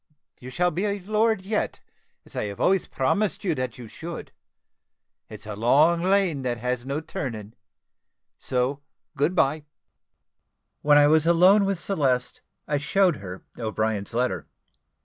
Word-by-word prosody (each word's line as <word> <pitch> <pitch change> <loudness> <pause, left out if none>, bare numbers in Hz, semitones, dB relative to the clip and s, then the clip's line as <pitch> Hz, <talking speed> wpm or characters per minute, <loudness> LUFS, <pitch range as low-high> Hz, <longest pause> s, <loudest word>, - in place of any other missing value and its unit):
You 125 - -9
shall 180 +7 +1
be 180 +6 -2
a 200 0 -2
lord 215 +1 +1
yet, 210 +2 -2 0.5
as - - -13
I 105 - -2
always 180 - +1
promised 195 +7 0
you 180 -4 +1
that 130 -4 -4
you 120 -2 -9
should. 165 +9 -8 1.0
It's 105 -1 -8
a 105 -1 -6
long 150 +10 +4
lane 185 -5 +2
that 125 -2 -2
has 125 +1 -3
no 140 +3 -2
turning 115 -9 -6 0.8
so 130 +2 -1 0.3
good 150 +6 +1
bye." 150 -2 +2 1.2
When 145 0 +5
I 145 - +7
was 155 +2 +4
alone 185 +4 +5
with 195 -3 -1
Celeste, 135 -10 -1 0.3
I 145 -1 0
showed 180 +2 +2
her 95 -2 -9 0.2
O'Brien's 110 -1 -2
letter. 120 - -1
145 Hz, 145 wpm, -25 LUFS, 125-180 Hz, 1.2 s, I